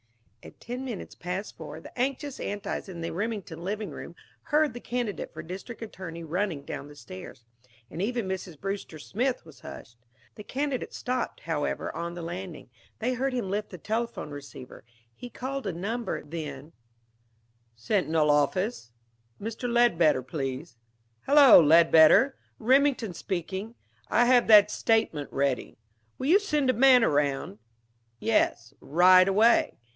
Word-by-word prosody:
At - - -14
ten 245 +2 -6
minutes 240 -7 -6
past 180 +4 -5
four, - - -9
the - - -13
anxious 270 +2 -2
Antis 205 -1 -4
in 170 -2 -7
the 165 - -3
Remington 195 -4 -4
living 205 -1 -3
room 170 - -9 0.3
heard 305 -3 +2
the 240 - -7
candidate 240 -7 -4
for - - -8
district 195 +7 -8
attorney 175 -6 -8
running 165 -2 -2
down 145 - -6
the 145 - -13
stairs, 115 -2 -11 0.5
and 170 - -5
even 235 0 -1
Mrs. 185 -4 -5
Brewster 195 -4 -5
Smith 240 - -2
was 160 -3 -15
hushed. 115 - -11 0.4
The 210 - -10
candidate 275 +2 -3
stopped, 250 0 -3
however, 160 -3 -3
on 170 +1 -4
the 175 - -6
landing. 175 -5 -7 0.3
They 250 +3 -1
heard 265 +2 -1
him 230 -7 -2
lift 210 +1 -2
the 180 - -9
telephone 225 -3 -3
receiver. 140 -3 -10 0.3
He 245 - -10
called 265 -1 -5
a - - 0
number. 215 +8 -4
Then 150 -1 -7 1.0
"Sentinel 155 - +1
office?... 150 - 0 0.5
Mr. 230 +3 -4
Ledbetter, 170 - +3
please.... 135 +1 -5 0.5
Hello, 280 -3 +9
Ledbetter! 165 - +6 0.2
Remington 255 -3 +2
speaking. 190 +6 -5 0.3
I 240 - +4
have 245 -1 +4
that 210 -1 +7
statement 215 -13 0
ready. 135 -2 -1 0.4
Will 260 - -4
you 350 +8 +5
send 300 -10 +1
a - - -4
man 255 0 +6
around?... 140 - 0 0.6
Yes, 140 - 0
right 185 +4 +6
away. 215 +5 +3
195 Hz, 145 wpm, -27 LUFS, 160-240 Hz, 1.0 s, Hello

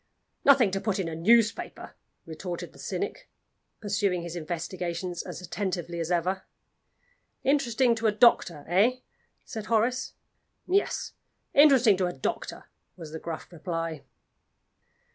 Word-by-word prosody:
"Nothing 260 -8 +6
to 195 0 -2
put 215 -3 0
in 190 -4 -2
a 165 - -4
newspaper," 225 +7 +2 0.3
retorted 175 +2 -6
the - - -16
cynic, - - -4 0.5
pursuing 200 -4 0
his 170 0 -6
investigations 175 +1 -4
as 180 - -8
attentively 175 -1 -3
as 165 0 -2
ever. 180 +2 0 1.0
"Interesting 260 -3 +3
to 225 0 0
a - - +4
doctor 200 -9 +3
eh?" 220 +9 +3 0.4
said 220 -4 -6
Horace. 235 +3 +1 0.5
"Yes. 395 +2 0 0.4
Interesting 265 -8 +6
to 185 -1 +1
a 175 - -3
doctor," 135 - -4 0.3
was 160 -3 -9
the 160 - -6
gruff 165 +1 -7
reply. 165 -2 -4
190 Hz, 125 wpm, -27 LUFS, 170-230 Hz, 1.0 s, Nothing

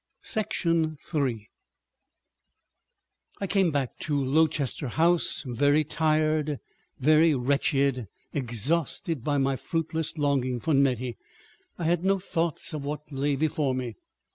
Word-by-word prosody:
§ 165 -7 0
3 130 -11 -2 1.9
I 200 - -1
came 195 -2 +2
back 140 -5 -2
to 150 - -2
Lowchester 145 0 +1
House 165 +4 +1
very 145 +5 +3
tired, 155 -1 +1 0.4
very 155 +3 +4
wretched; 135 -1 +1 0.3
exhausted 140 - -1
by 145 +1 +1
my 135 0 +1
fruitless 160 +2 -2
longing 135 -4 +1
for 160 +5 0
Nettie. 130 -3 +1 0.6
I - - -4
had 170 +1 +1
no 195 +1 +3
thought 170 -2 -2
of 150 -2 -4
what 150 +1 -5
lay 140 +1 0
before 145 -2 0
me. 125 -3 -3
145 Hz, 115 wpm, -27 LUFS, 135-160 Hz, 1.9 s, very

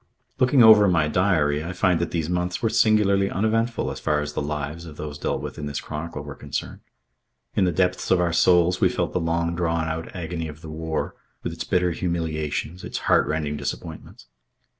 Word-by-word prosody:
Looking 130 0 +5
over 105 -2 +8
my 85 -4 +3
diary 80 -4 +2
I 85 +3 -5
find 90 -2 +2
that 85 - -1
these 80 -3 -2
months 90 0 -1
were 115 - +2
singularly 105 -3 +3
uneventful 115 +4 0
as - - -6
far 75 -1 +1
as 75 0 -4
the - - -2
lives 75 +3 -4
of 75 -2 -11
those 75 -1 -6
dealt - - -2
with - - -6
in 75 - -4
this 70 - -3
chronicle 80 +2 -6
were - - -7
concerned. - - -5 0.8
In 95 - +3
the 90 - +2
depths 90 0 0
of 95 - +4
our 85 -1 +1
souls 90 +1 +4
we - - +5
felt - - -2
the - - +1
long 85 0 0
drawn 85 -1 0
out 80 +3 -5
agony 85 -2 -4
of 75 0 -10
the 80 - -9
war, 80 0 -3 0.3
with - - -3
its - - -5
bitter 90 -1 +1
humiliations, 80 0 -3
its - - -4
heartrending 75 -1 +1
disappointments. 80 0 -7
85 Hz, 200 wpm, -24 LUFS, 80-90 Hz, 0.8 s, over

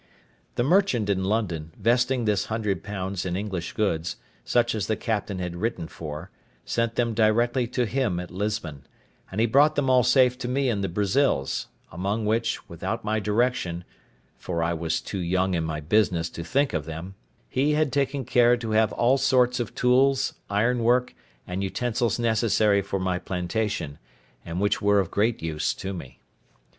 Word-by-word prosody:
The 120 - +1
merchant 135 - +2
in 95 -1 0
London, 85 -7 -1
vesting 125 +1 +2
this 105 -2 +1
hundred 105 -5 -2
pounds 95 -2 -4
in 90 -1 -2
English 95 -4 -4
goods, 85 -6 -1 0.3
such 120 0 +2
as 110 -4 -2
the 110 - +1
captain 105 -3 -2
had 90 -1 -4
written 100 -4 -2
for, 80 +4 -8 0.3
sent 115 -1 -1
them 120 -2 +1
directly 120 +3 +2
to 125 0 0
him 110 -6 0
at 90 -1 -7
Lisbon, 90 -8 -4 0.4
and 95 - -3
he 115 - +4
brought 145 +6 +4
them 135 -2 +2
all 125 -1 +6
safe 125 0 +4
to 125 - -3
me 135 +1 +1
to - - 0
the 100 -1 -1
Brazils; 100 - +1 0.2
among 100 +6 -2
which, 115 +2 0
without 85 +7 -4
my 110 +1 +1
direction 105 -5 0 0.6
(for 85 -2 -2
I 85 +1 0
was 80 0 -1
too 100 - -5
young 95 +2 +1
in 85 -2 0
my 80 -1 -3
business 85 0 +1
to 85 - -6
think 140 - +1
of 80 -3 -2
them), 80 +4 -7 0.3
he 140 - +1
had 150 -4 +1
taken 140 -1 0
care 120 +1 +4
to 115 -2 -4
have 110 0 +3
all 130 +3 +3
sorts 125 -2 +3
of 120 -4 -4
tools, 130 +2 +3 0.2
ironwork, 120 +4 +2 0.3
and 90 +2 -3
utensils 120 +3 -1
necessary 110 -3 +2
for 100 0 -3
my 90 -1 -1
plantation, 90 -4 -3 0.4
and 85 +1 -4
which 105 +1 +1
were 100 0 +4
of 95 - -1
great 110 -2 0
use 80 -2 -1
to 95 +1 -5
me. 75 -9 -9
105 Hz, 175 wpm, -25 LUFS, 90-120 Hz, 0.6 s, all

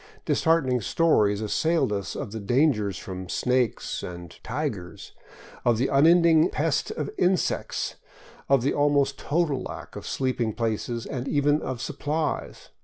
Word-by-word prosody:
Disheartening 135 -7 +2
stories 110 -8 +2
as 105 - -2
sailed 160 -9 +1
us 100 -2 -3
of - - -5
the 110 - -5
dangers 105 - +1
from 95 -1 -7
snakes 125 -2 0
and 85 -1 -8
" - - -43
tigers," 90 0 -4 0.5
of 120 -2 +3
the 130 +4 +1
unending 165 +3 +5
pest - - 0
of - - -4
insects, 180 0 0 0.5
of 135 -3 +4
the 140 - +1
almost 140 -2 +2
total 150 -4 0
lack - - -8
of - - -7
sleeping 125 -4 -1
places 115 +1 -2
and 130 -1 -4
even 145 +1 +2
of 130 -3 -4
supplies. 150 +3 -3
130 Hz, 145 wpm, -26 LUFS, 110-150 Hz, 0.5 s, unending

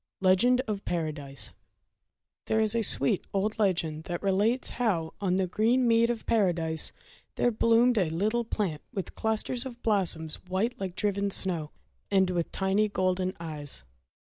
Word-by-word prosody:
Legend 200 +7 +4
of 210 -5 -4
Paradise 150 -5 -2 0.9
THERE 220 - +2
is 220 +1 +3
a 230 - +2
sweet 140 -9 +2
old 210 +3 -1
legend 165 -6 0
that 175 0 -4
relates 205 +6 +1
how 170 -9 0
on 185 -2 +1
the 190 0 +1
green 230 +7 +2
mead 230 0 +4
of 235 -2 -3
Paradise 170 -7 +1 0.4
there 245 - +2
bloomed 230 +1 +3
a 180 -5 +1
little 215 +9 0
plant 195 -9 -2
with 190 -4 -5
clusters 220 +3 0
of 250 -3 -8
blossoms 170 -7 +1
white 195 +6 0
like 190 -2 -4
driven 200 -1 0
snow, 175 -6 0 0.4
and 190 -2 +3
with 170 -2 -2
tiny 195 +2 +1
golden 185 -1 0
eyes. 150 - -3
195 Hz, 150 wpm, -28 LUFS, 170-220 Hz, 0.9 s, Legend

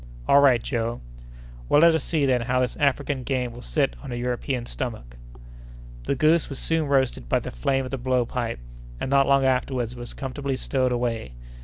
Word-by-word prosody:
"All 140 - +6
right, 130 -5 +5
Joe!" 115 -2 -2 0.7
"Well, 145 - +5
let 170 0 +7
us 160 - 0
see 155 -4 0
then 125 -2 +2
how 125 +2 0
this 125 -1 0
African 140 -1 0
game 125 -1 -2
will 120 - -10
sit - - 0
on - - -8
a - - -3
European 125 +1 -2
stomach!" 110 - -6 0.9
The - - 0
goose 155 +4 +3
was 140 - -5
soon 160 0 0
roasted 130 - 0
by - - +3
the - - -5
flame 135 - 0
of 130 - -7
the 135 - -3
blow 125 0 +1
pipe, 120 -1 -3 0.4
and 135 - -3
not 140 -1 +4
long 140 -1 +4
afterward 125 -2 0
was 120 -1 -8
comfortably 135 0 -3
stowed 130 -2 0
away. 115 - -2
130 Hz, 195 wpm, -24 LUFS, 120-140 Hz, 0.9 s, let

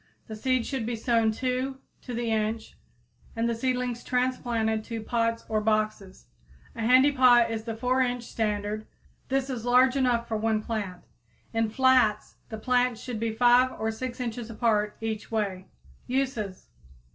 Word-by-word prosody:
The 220 - -7
seeds 255 +2 0
should 260 -5 -3
be 240 - -1
sown 230 0 +2
two 255 +3 -2 0.2
to 245 - -6
the 235 -1 -1
inch 220 0 -2 0.6
and 230 0 0
the 235 - 0
seedlings 250 0 -2
transplanted 240 -3 0
to 230 -2 -5
pots 230 0 -1
or 215 -1 0
boxes. 215 - -1 0.5
A - - -5
handy 255 +5 +5
pot 245 -3 +5
is 220 -1 -4
the 225 -1 -4
4 255 +2 +1
inch 245 -1 0
standard; 215 -2 -2 0.4
this 270 0 0
is 250 -4 -4
large 250 +2 +4
enough 245 -3 +1
for 220 - -1
one 215 0 0
plant. 205 -6 -4 0.5
In 225 -1 +1
flats 255 -3 +2
the 220 - -5
plants 245 0 +1
should 245 -4 -5
be 225 0 -1
5 245 +3 +4
or 220 0 0
6 245 +3 -6
inches 235 -1 -4
apart 215 -2 0
each 220 -1 -4
way. 195 -4 -2 0.4
_Uses. 245 -7 -2
230 Hz, 160 wpm, -27 LUFS, 220-250 Hz, 0.6 s, handy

